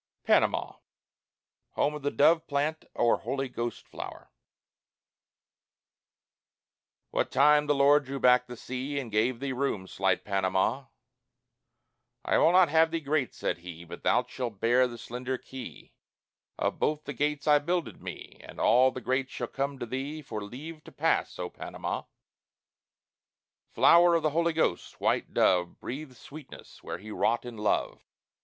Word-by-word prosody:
PANAMA - - +2 0.9
HOME 150 - +1
OF 150 - -6
THE 145 - 0
DOVE 160 +3 +3
PLANT 150 +2 -1
OR 120 -1 +3
HOLY 135 0 -3
GHOST 120 -1 -5
FLOWER - - -9
I - - -53 2.8
What - - 0
time 150 +2 +5
the 145 - +3
Lord 140 +1 +5
drew 135 +1 -5
back 125 0 +4
the 120 -1 -9
sea 130 +4 -5
And 130 -5 -4
gave 115 +3 +1
thee 135 0 -3
room, 130 -7 -2
slight 95 0 0
Panama, 95 +6 0 1.4
"I - - +3
will 165 - +5
not 180 -2 +5
have 160 +1 +4
thee 165 0 -2
great," 145 -3 -1
said - - -2
he, 85 -1 -9
"But 85 +1 -10
thou 125 - +3
shalt 120 -4 -6
bear 125 +3 +4
the 120 -1 -9
slender 125 +2 -4
key 130 +1 -10 0.6
Of - - -1
both 155 0 0
the 140 - -6
gates 145 +2 -1
I 150 -1 +5
builded 170 +3 -2
me, - - -9
And - - -11
all 125 +3 +5
the 130 0 -7
great 130 +1 -1
shall - - -4
come 140 0 -3
to 125 - -4
thee 135 +6 -5
For 110 -6 -5
leave 150 +9 -9
to - - -12
pass, - - 0
O - - -3
Panama!" - - -5 1.6
(Flower 170 0 +6
of 165 - +1
the 155 - +2
Holy 170 +2 +1
Ghost, 155 - -1
white - - 0
dove, 90 -2 +2
Breathe 140 +1 -6
sweetness 140 +4 -13
where - - -5
he 105 +4 -10
wrought 120 +3 0
in 120 -1 -7
love.) 105 0 -1
135 Hz, 160 wpm, -28 LUFS, 120-150 Hz, 2.8 s, Flower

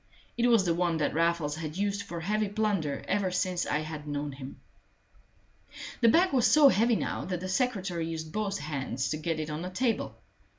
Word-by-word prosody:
It 240 0 +2
was 230 -5 +4
the 170 - +2
one 170 -1 0
that 150 - 0
Raffles 165 -2 +1
had 155 0 -5
used 200 0 0
for 170 -4 -6
heavy 210 +3 0
plunder 200 -9 -1
ever 195 -1 +1
since 180 -1 -1
I 150 - 0
had 155 -1 -7
known 145 0 -3
him. 135 0 -9 1.4
The 230 - +5
bag 355 +8 +4
was 250 -4 +4
so 300 -2 +7
heavy 230 +1 +3
now - - -2
that 180 -1 -3
the 185 - -5
secretary 185 -6 -1
used 160 -1 -5
both 205 0 -2
hands 135 -4 -3
to 155 - -1
get 160 0 -2
it 155 0 -4
on 150 +2 -4
the 180 - -4
table. 230 +5 -1
175 Hz, 200 wpm, -29 LUFS, 155-210 Hz, 1.4 s, so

